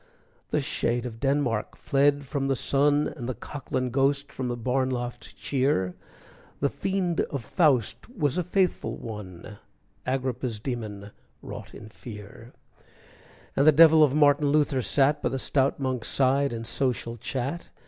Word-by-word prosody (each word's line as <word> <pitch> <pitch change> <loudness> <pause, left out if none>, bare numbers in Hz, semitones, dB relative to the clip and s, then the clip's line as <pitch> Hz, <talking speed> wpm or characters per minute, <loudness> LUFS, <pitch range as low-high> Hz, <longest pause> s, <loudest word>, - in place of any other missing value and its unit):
The - - +1
shade 120 +1 -1
of 115 -2 -7
Denmark 135 -5 0
fled 140 +1 +2
from 135 0 -2
the 135 - +1
sun, 145 +3 +2
And 125 -5 -5
the 130 - -3
Cocklane 130 0 -4
ghost 140 +2 +1
from 130 - -4
the 120 0 -2
barn 130 +2 0
loft 120 -1 -5
cheer, 130 -10 0 0.7
The 140 - +1
fiend 180 +3 -1
of 140 -5 -4
Faust 140 - +1
was 155 - 0
a - - 0
faithful 180 +1 0
one, 105 -2 -8 0.5
Agrippa's 130 -3 -2
demon 105 -4 -5 0.3
wrought - - -9
in 110 - -10
fear, 110 +2 -11 1.0
And 140 +2 +3
the - - +10
devil 160 +1 +7
of 145 -2 +3
Martin 145 -1 +4
Luther 145 -2 +2
sat 145 +4 +2
By - - 0
the 135 - -2
stout 135 +1 +1
monk's 130 -4 -2
side 140 +1 +2
in 115 -1 -4
social 120 -1 -1
chat. 135 +8 -4
135 Hz, 150 wpm, -26 LUFS, 120-145 Hz, 1.0 s, the